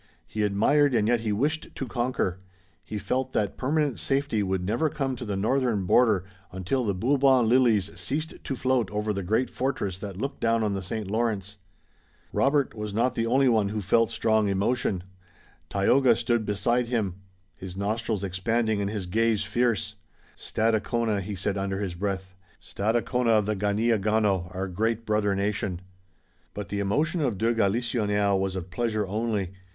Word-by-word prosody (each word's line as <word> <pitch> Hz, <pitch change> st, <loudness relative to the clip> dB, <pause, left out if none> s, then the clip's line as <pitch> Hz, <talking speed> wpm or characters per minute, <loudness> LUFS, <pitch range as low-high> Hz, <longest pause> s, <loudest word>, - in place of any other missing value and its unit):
He 110 Hz, -, -4 dB
admired 125 Hz, +8 st, +3 dB
and 105 Hz, -2 st, +2 dB
yet 120 Hz, 0 st, +3 dB
he 110 Hz, -1 st, -2 dB
wished 150 Hz, +9 st, -1 dB
to 135 Hz, -, -4 dB
conquer. 120 Hz, -7 st, -1 dB, 0.4 s
He 105 Hz, -, -5 dB
felt 130 Hz, +6 st, -2 dB
that 105 Hz, -2 st, 0 dB
permanent 145 Hz, -, 0 dB
safety 135 Hz, -, 0 dB
could 95 Hz, -2 st, -1 dB
never 120 Hz, +11 st, +1 dB
come 135 Hz, -4 st, -2 dB
to 120 Hz, -, -7 dB
the 100 Hz, -3 st, -2 dB
northern 115 Hz, -1 st, +1 dB
border 110 Hz, -2 st, +4 dB, 0.3 s
until 95 Hz, +8 st, -1 dB
the 100 Hz, -4 st, 0 dB
Bourbon 130 Hz, +3 st, +3 dB
lilies 115 Hz, -5 st, +3 dB
ceased 155 Hz, +3 st, -3 dB
to 135 Hz, -, -3 dB
float 130 Hz, -4 st, +1 dB
over 105 Hz, +1 st, -1 dB
the 100 Hz, -, -3 dB
great 110 Hz, +7 st, 0 dB
fortress 115 Hz, -8 st, -2 dB
that 100 Hz, -3 st, -6 dB
looked 135 Hz, +7 st, -4 dB
down 115 Hz, -1 st, +2 dB
on 105 Hz, -2 st, 0 dB
the 95 Hz, -, -2 dB
St. 100 Hz, +2 st, -4 dB
Lawrence. 105 Hz, -3 st, -1 dB, 0.8 s
Robert 140 Hz, -2 st, +2 dB
was 105 Hz, -2 st, -5 dB
not 120 Hz, +3 st, +2 dB
the 115 Hz, 0 st, -1 dB
only 135 Hz, +3 st, +3 dB
one 110 Hz, -5 st, +3 dB
who 105 Hz, +1 st, -2 dB
felt 110 Hz, +4 st, +2 dB
strong 110 Hz, -2 st, +2 dB
emotion. 100 Hz, -1 st, 0 dB, 0.7 s
Tayoga 120 Hz, +5 st, +4 dB
stood 115 Hz, -1 st, 0 dB
beside 120 Hz, +4 st, +1 dB
him, 105 Hz, -7 st, -1 dB, 0.4 s
his 95 Hz, +2 st, -8 dB
nostrils 110 Hz, 0 st, -1 dB
expanding 110 Hz, +3 st, 0 dB
and 100 Hz, -, -1 dB
his 105 Hz, -3 st, -3 dB
gaze 110 Hz, +3 st, +1 dB
fierce: 110 Hz, -1 st, 0 dB, 0.4 s
"Stadacona!" 110 Hz, -1 st, 0 dB
he 100 Hz, +2 st, -5 dB
said 100 Hz, +1 st, -2 dB
under 95 Hz, 0 st, -2 dB
his 100 Hz, -4 st, -3 dB
breath, 95 Hz, 0 st, -3 dB, 0.3 s
"Stadacona 115 Hz, +2 st, +1 dB
of 105 Hz, -, +1 dB
the 105 Hz, +1 st, 0 dB
Ganeagaono, 105 Hz, -2 st, +1 dB
our 95 Hz, +1 st, -2 dB
great 110 Hz, +5 st, -1 dB
brother 105 Hz, -2 st, +1 dB
nation!" 100 Hz, -2 st, -1 dB, 0.8 s
But 105 Hz, -1 st, -5 dB
the 100 Hz, -, -2 dB
emotion 150 Hz, -, 0 dB
of 125 Hz, -9 st, 0 dB
de 115 Hz, +4 st, +2 dB
Galisonnière 105 Hz, -2 st, +1 dB
was 95 Hz, 0 st, -1 dB
of 90 Hz, -1 st, -6 dB
pleasure 110 Hz, -2 st, -1 dB
only. 105 Hz, -2 st, -2 dB
110 Hz, 165 wpm, -26 LUFS, 100-120 Hz, 0.8 s, border